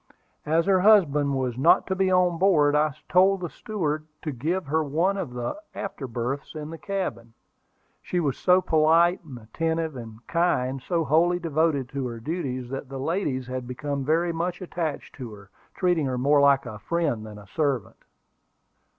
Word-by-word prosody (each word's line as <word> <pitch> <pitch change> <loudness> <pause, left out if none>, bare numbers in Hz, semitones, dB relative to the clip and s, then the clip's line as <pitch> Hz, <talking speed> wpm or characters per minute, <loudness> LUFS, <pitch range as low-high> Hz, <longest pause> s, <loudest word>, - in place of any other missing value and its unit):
As 160 +2 +2
her 190 -1 +4
husband 150 -9 +4
was 130 -2 -2
not 165 +6 +5
to 190 - -2
be 190 0 +2
on 180 -2 +3
board, 155 -7 +4
I 150 -1 +2
told 190 +1 +4
the 175 - -4
steward 155 -8 -3 0.2
to 155 - -2
give 160 +8 -2
her 155 +3 +1
one 165 +7 +1
of 190 -10 -4
the 120 - -4
after 150 -8 -5
berths 125 +6 -4
in 155 0 -6
the 165 - -8
cabin. 180 - -4 0.7
She 180 - -2
was 145 -6 0
so 185 0 +4
polite, 165 +2 +4 0.2
attentive, 160 +7 -2
and 115 -2 -10
kind, 135 -7 0
so 170 +2 0
wholly 165 +4 +3
devoted 160 -5 0
to 135 -2 -3
her 115 -1 -6
duties, 130 -2 -3
that 135 0 -5
the 135 - -6
ladies 140 -4 -1
had 125 0 -5
become 140 +2 -3
very 165 +4 +1
much 170 +2 -2
attached 170 -5 -4
to 125 -5 -7
her, 100 -1 -16 0.2
treating 175 -6 +1
her 130 -1 -2
more 140 +3 +4
like 140 -1 +4
a 110 -3 -7
friend 145 -2 -1
than 105 -1 -9
a 105 - -12
servant. 135 +1 -2
150 Hz, 175 wpm, -25 LUFS, 130-175 Hz, 0.7 s, not